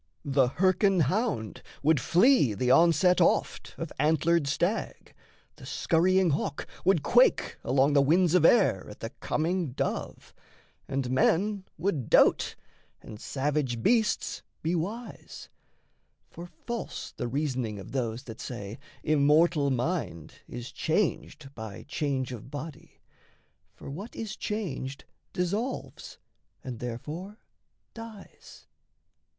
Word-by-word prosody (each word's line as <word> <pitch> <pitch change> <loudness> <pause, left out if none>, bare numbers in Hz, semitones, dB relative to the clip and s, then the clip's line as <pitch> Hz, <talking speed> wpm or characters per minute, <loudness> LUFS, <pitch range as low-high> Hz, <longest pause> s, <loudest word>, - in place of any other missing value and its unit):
The 135 -2 +3
Hyrcan 190 0 +3
hound 160 - -1 0.2
would 155 0 +4
flee 175 - +4
the 125 +5 +1
onset 175 +4 +5
oft 170 - +1
Of 165 -2 -5
antlered 160 +1 +2
stag, 175 +9 -2 0.4
the - - -12
scurrying 180 +1 +2
hawk 145 0 -2 0.2
would 180 -6 +3
quake 245 +2 +3
Along 135 +3 +3
the 140 - +5
winds 170 +4 +3
of 180 -3 +4
air 165 - +4
at 105 - -12
the 115 - -5
coming 165 -2 -2
dove, - - -4 0.5
And 135 -2 -2
men 190 +9 +2
would 160 - -2
dote, - - +4 0.5
and 105 - -10
savage 135 -4 -1
beasts 225 -3 +1 0.2
be 165 +2 0
wise; 205 +8 -5 0.8
For 170 +1 -9
false 230 +8 -6
the - - -4
reasoning 130 -5 -2
of 95 - -9
those 120 -3 -2
that 115 -2 -9
say 110 -2 -7 0.2
Immortal 150 0 +3
mind 130 - -2
is 120 +2 -7
changed 160 -5 -2
by 110 -5 -8
change 135 -4 -2
of 125 +1 -8
body 145 +1 -9 0.7
For - - -12
what 190 +11 -7
is 215 -2 -5
changed 150 -10 -4 0.3
dissolves, 205 +9 -3 0.5
and 125 -3 -6
therefore 150 - -6 0.6
dies. 225 -3 -12
155 Hz, 120 wpm, -28 LUFS, 130-185 Hz, 0.8 s, onset